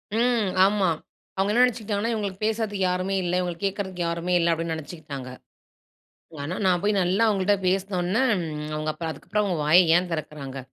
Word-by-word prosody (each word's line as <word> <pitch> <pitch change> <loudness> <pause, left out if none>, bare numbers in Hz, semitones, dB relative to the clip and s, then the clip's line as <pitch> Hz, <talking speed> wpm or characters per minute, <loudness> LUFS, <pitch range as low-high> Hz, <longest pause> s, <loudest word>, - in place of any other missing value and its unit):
ம் 235 -4 +2 0.2
ஆமா. 200 -3 +2 0.5
அவுங்க 195 +2 +1
என்ன 235 +3 +4
நெனைச்சுட்டாங்கன்னா, 225 -2 0
இவுங்களுக்கு 205 -2 -4
பேசுறதுக்கு 215 -3 -1
யாருமே 185 +2 -1
இல்ல. 175 0 -2
இவுங்கள 175 -2 -3
கேக்குறதுக்கு 190 -2 -2
யாருமே 170 +2 -2
இல்ல 170 0 +2
அப்பிடின்னு 165 0 -1
நெனைச்சுக்கிட்டாங்க. 150 -5 -8 1.1
ஆனா, 155 +6 -3
நான் 180 -2 +3
போய் 210 +1 +2
நல்லா 185 +5 +1
அவுங்கள்ட்ட 200 -1 +2
பேசுனவுனே, 190 +3 0 0.4
ம், 150 - -5
அவுங்க 155 0 -2
அப்ப 165 - -7
அதுக்கப்புறம் 210 +6 -2
அவுங்க 185 -4 -1
வாய 155 +4 +6 0.2
ஏன் 180 0 -2
திறக்குறாங்க? 150 -4 -5
185 Hz, 160 wpm, -25 LUFS, 170-205 Hz, 1.1 s, வாய